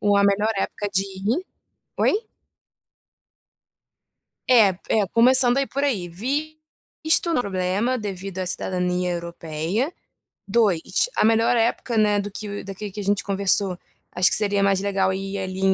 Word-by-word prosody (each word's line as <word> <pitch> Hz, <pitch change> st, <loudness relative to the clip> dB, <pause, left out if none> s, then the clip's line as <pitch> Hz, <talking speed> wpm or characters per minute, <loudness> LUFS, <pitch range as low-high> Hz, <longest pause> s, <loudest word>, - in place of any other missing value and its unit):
o 205 Hz, -1 st, +3 dB
a 200 Hz, -, +4 dB
melhor 205 Hz, +2 st, +2 dB
época 205 Hz, +1 st, -2 dB
de 190 Hz, -, +2 dB
ir 200 Hz, -, -2 dB, 0.5 s
oi? -, -, +2 dB, 2.4 s
É, 215 Hz, -7 st, +5 dB
é 215 Hz, -2 st, +3 dB
começando 250 Hz, +1 st, +5 dB
aí, 275 Hz, -, +1 dB
por 280 Hz, +1 st, -3 dB
aí. 210 Hz, -11 st, 0 dB
Visto 310 Hz, -, -3 dB
não 320 Hz, -, +2 dB
é -, -, +2 dB
problema 200 Hz, +5 st, -1 dB
devido 195 Hz, -3 st, -6 dB
à 185 Hz, -, -2 dB
cidadania 180 Hz, -1 st, -1 dB
europeia. 170 Hz, -, -3 dB, 0.5 s
2, 200 Hz, -, +1 dB
a -, -, +3 dB
melhor 225 Hz, +2 st, +3 dB
época, 230 Hz, +1 st, 0 dB
né, 210 Hz, -2 st, +3 dB
do 205 Hz, -, -5 dB
que 205 Hz, 0 st, -6 dB, 0.3 s
que 210 Hz, -, -6 dB
a -, -, -3 dB
gente 200 Hz, 0 st, 0 dB
conversou. 195 Hz, -1 st, +1 dB, 0.4 s
Acho 180 Hz, +1 st, +3 dB
que -, -, +2 dB
seria 200 Hz, -1 st, +1 dB
mais 195 Hz, -1 st, +2 dB
legal 195 Hz, -1 st, +1 dB
ir 195 Hz, +1 st, -4 dB
ali 190 Hz, 0 st, -5 dB
200 Hz, 150 wpm, -23 LUFS, 190-235 Hz, 2.4 s, É